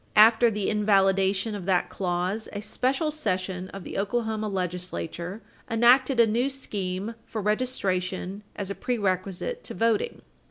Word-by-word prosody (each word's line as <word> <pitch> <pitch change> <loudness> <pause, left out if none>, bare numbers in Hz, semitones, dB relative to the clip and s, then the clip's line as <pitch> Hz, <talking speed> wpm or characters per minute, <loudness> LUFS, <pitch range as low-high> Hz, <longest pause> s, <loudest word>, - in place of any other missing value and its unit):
After 225 +2 +7
the 210 -2 -2
invalidation 195 0 +2
of 200 -4 -5
that 180 -2 +2
clause, 185 +3 -2
a 205 - -4
special 265 +8 0
session 185 -10 -2
of 195 -2 -8
the - - -4
Oklahoma 220 +1 -1
legislature 180 +1 -4 0.3
enacted 245 +3 +5
a 235 - +8
new 235 +5 +1
scheme 205 -6 -4
for 220 - -4
registration 200 -4 -1
as 200 -1 -3
a - - -1
prerequisite 200 - -2
to - - -6
voting. 230 - 0
205 Hz, 135 wpm, -26 LUFS, 185-230 Hz, 0.3 s, a